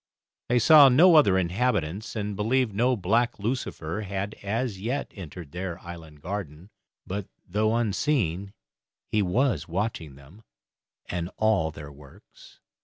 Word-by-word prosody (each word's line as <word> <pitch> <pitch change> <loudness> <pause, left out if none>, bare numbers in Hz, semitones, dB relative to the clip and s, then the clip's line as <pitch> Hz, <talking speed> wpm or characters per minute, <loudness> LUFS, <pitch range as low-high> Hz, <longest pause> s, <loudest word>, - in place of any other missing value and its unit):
They 125 - +3
saw 145 +3 +8
no 165 +8 +6
other 145 -12 +6
inhabitants, 95 0 -1
and 105 -1 -3
believed 115 +4 +1
that - - -13
no 125 +3 +3
black 115 +6 +1
lucifer 105 -5 -3
had 100 0 -4
as 105 -1 -2
yet 130 +6 -3
entered 85 -5 -9
their 90 0 -5
island 80 -4 -11
garden; 90 -1 -6 0.3
but, 100 +1 -4 0.2
though 110 +4 +1
unseen, 105 - 0 0.6
he 105 - +2
was 100 - 0
watching 85 -5 -3
them 70 +10 -17 0.6
and 85 0 -4
all 110 -8 +2
their 75 -1 -10
works. 70 -1 -17
100 Hz, 135 wpm, -26 LUFS, 85-115 Hz, 0.6 s, saw